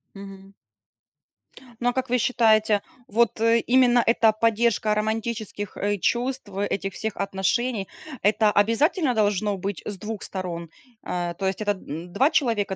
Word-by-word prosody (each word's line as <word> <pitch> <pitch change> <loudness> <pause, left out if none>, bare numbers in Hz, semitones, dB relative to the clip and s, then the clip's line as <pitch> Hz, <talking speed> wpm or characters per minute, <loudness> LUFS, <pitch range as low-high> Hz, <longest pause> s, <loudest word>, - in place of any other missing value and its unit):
Мгм. 195 0 -11 1.3
Ну, 245 0 +1
а - - -1
как 260 -1 -2
вы 250 - +2
считаете, 220 -4 +3 0.3
вот, 225 0 +1
э, 230 0 +4
именно 245 0 +4
эта 225 -1 +4
поддержка 220 -1 +1
романтических, 215 -1 -3
э, 205 0 0
чувств, 245 +2 -1 0.2
этих 195 -1 -3
всех 220 -1 -4
отношений- 195 +3 -1 0.3
это 210 +1 +3
обязательно 250 - +2
должно 205 -2 +1
быть 195 0 -4
с 205 - -4
2 210 +1 -6
сторон? 170 -3 -5 0.3
А, 175 -1 -3
то 190 +2 -3
есть, 190 +2 -2
это, 205 -1 +1
м, 175 -2 -7
2 265 +9 +3
человека 220 -8 +1
215 Hz, 145 wpm, -24 LUFS, 195-235 Hz, 1.3 s, э